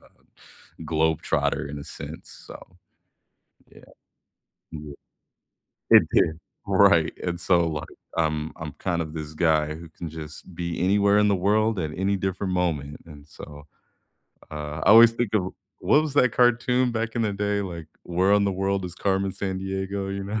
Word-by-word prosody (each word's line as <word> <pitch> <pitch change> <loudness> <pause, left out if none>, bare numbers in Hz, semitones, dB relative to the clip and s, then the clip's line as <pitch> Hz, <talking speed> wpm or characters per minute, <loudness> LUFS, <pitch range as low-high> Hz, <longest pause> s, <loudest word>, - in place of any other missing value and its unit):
uh, - - -22 0.7
globetrotter 80 -2 0
in 75 - -6
a 70 - -9
sense. 80 - -10
So, - - -14 0.9
yeah. - - -18 0.9
Ye 75 -2 -8 1.0
It - - +7
did. 80 +1 +2 0.3
Right. - - +4
And 85 -1 -2
so, 85 -1 +2
like, 75 -2 -5 0.3
I'm 80 -1 -1
I'm 80 -2 -7
kind 85 -3 -2
of 80 -1 -8
this 80 -1 -6
guy 75 -2 +1
who 85 +1 -10
can 85 +1 -7
just 80 +2 -10
be 85 0 -4
anywhere 100 +2 +3
in 105 0 +4
the 100 - +2
world 105 +3 +1
at 80 -3 -2
any 100 +1 +1
different 95 0 -3
moment 75 -5 -2
and 75 -2 -13
so, 75 0 -12 0.8
uh, 75 0 -6
I - - +5
always 115 +1 +9
think 115 -2 -2
of 95 -3 0 0.3
what 150 - +4
was 155 -3 -4
that 125 -5 +4
cartoon 125 +1 +2
back 115 0 -3
in 115 - +1
the 105 -2 0
day? 100 0 -1
Like, 85 -4 -7 0.2
Where 90 +3 +1
in 100 - +3
the 100 - 0
World 95 0 -1
is 90 - -7
Carmen 95 0 0
Sandiego? 95 +1 -4
You 100 0 -4
know? 105 +2 -3
95 Hz, 170 wpm, -25 LUFS, 80-100 Hz, 1.0 s, always